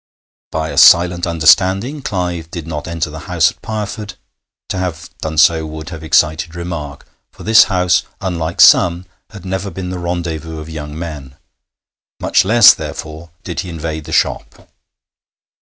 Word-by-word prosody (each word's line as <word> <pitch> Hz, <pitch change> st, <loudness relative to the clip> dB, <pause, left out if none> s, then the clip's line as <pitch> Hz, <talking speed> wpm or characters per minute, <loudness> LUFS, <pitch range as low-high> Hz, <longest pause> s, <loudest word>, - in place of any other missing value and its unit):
By 80 Hz, 0 st, -3 dB
a -, -, 0 dB
silent 85 Hz, +1 st, +5 dB
understanding 95 Hz, -, +2 dB
Clive 90 Hz, -7 st, -3 dB
did 85 Hz, -2 st, -7 dB
not 75 Hz, -2 st, -6 dB
enter 80 Hz, -2 st, -3 dB
the 80 Hz, -, -8 dB
house 85 Hz, -2 st, +3 dB
at -, -, -24 dB
Pireford; 105 Hz, -1 st, -5 dB, 0.5 s
to 95 Hz, -, -3 dB
have 90 Hz, -4 st, -5 dB
done 80 Hz, 0 st, -4 dB
so 80 Hz, +1 st, +4 dB
would 80 Hz, +1 st, -8 dB
have 80 Hz, -2 st, -9 dB
excited 80 Hz, +1 st, +1 dB
remark, 85 Hz, -5 st, -6 dB, 0.3 s
for -, -, -14 dB
this 110 Hz, +1 st, +6 dB
house, 90 Hz, -1 st, +1 dB, 0.2 s
unlike 85 Hz, -1 st, -2 dB
some, 90 Hz, -1 st, +5 dB, 0.2 s
had 100 Hz, -4 st, -12 dB
never 95 Hz, +1 st, -3 dB
been 95 Hz, -1 st, -6 dB
the 90 Hz, -, -5 dB
rendezvous 85 Hz, -2 st, -4 dB
of 75 Hz, +1 st, -9 dB
young 75 Hz, -1 st, -7 dB
men; 75 Hz, -5 st, -8 dB, 0.8 s
much -, -, +2 dB
less, 110 Hz, +2 st, +7 dB
therefore, 80 Hz, +2 st, -8 dB
did 85 Hz, -, -5 dB
he 90 Hz, -, -4 dB
invade 80 Hz, -2 st, -5 dB
the -, -, -9 dB
shop. -, -, -2 dB
85 Hz, 155 wpm, -16 LUFS, 80-90 Hz, 0.8 s, less